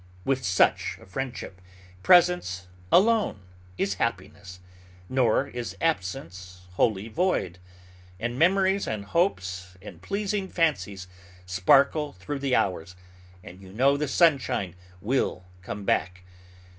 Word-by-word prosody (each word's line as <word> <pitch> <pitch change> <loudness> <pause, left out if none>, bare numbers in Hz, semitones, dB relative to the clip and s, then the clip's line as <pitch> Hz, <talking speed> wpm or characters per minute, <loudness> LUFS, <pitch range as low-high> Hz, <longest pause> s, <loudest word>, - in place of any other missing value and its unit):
With 135 -1 0
such 90 -4 +2
a - - -15
friendship, 115 -3 -6 0.4
presence 95 - +4 0.3
alone 210 - +3 0.4
is 100 - 0
happiness; 95 -4 -4 0.5
nor 130 +1 +2
is 120 -1 -6
absence 90 - -3
wholly 100 +2 0
void, 110 - -1 0.6
for 120 - -1
memories, 190 +8 +2
and 105 -2 -4
hopes, 95 - -1
and 100 - -12
pleasing 200 -1 -2
fancies, 100 - -1 0.4
sparkle 140 - +3
through 95 +11 -6
the 135 -2 +1
hours, 90 -2 -1 0.5
and 90 +2 -12
you 95 -1 -13
know 135 +7 +3
the 150 +1 -1
sunshine 135 - +2 0.3
will 105 -6 -1 0.2
come 100 +3 -6
back. 90 -1 -1
110 Hz, 115 wpm, -26 LUFS, 95-150 Hz, 0.6 s, presence